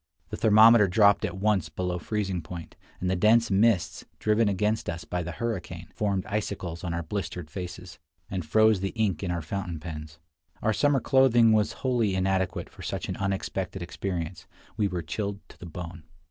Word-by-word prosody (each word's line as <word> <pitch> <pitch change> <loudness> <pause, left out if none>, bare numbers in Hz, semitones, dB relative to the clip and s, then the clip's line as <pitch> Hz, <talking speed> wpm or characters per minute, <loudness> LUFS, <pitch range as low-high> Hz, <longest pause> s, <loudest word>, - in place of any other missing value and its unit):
The - - -4
thermometer 110 0 +7
dropped 100 +2 +4
at - - -4
once 95 -4 +1
below 90 +2 -3
freezing 95 -3 -2
point, 85 0 -9 0.2
and 90 - -2
the 95 - +1
dense 110 +4 +4
mists, 100 -1 +2
driven 110 0 +2
against 105 +2 0
us 85 0 -5
by 90 - -2
the 85 0 -5
hurricane, 90 -7 -4
formed 100 -3 -1
icicles 100 -5 -4
on 90 - -2
our 85 0 -2
blistered 90 -2 -5
faces, 90 +1 -7 0.3
and 95 -2 -3
froze 110 +6 +4
the 95 +1 -3
ink 105 -7 0
in 95 - -3
our 85 -2 -2
fountain 90 0 -4
pens. 75 -2 -8 0.5
Our 110 - +2
summer 145 +2 +2
clothing 120 -4 +5
was 105 -1 +2
wholly 115 -6 +2
inadequate 95 -1 0
for - - -13
such - - -4
an - - -3
unexpected 95 -1 -3
experience; 85 -2 -5 0.3
we 105 -2 +1
were 90 -3 -3
chilled 100 +5 -3
to - - -16
the 90 - -8
bone. 85 0 -7
95 Hz, 180 wpm, -27 LUFS, 90-105 Hz, 0.5 s, thermometer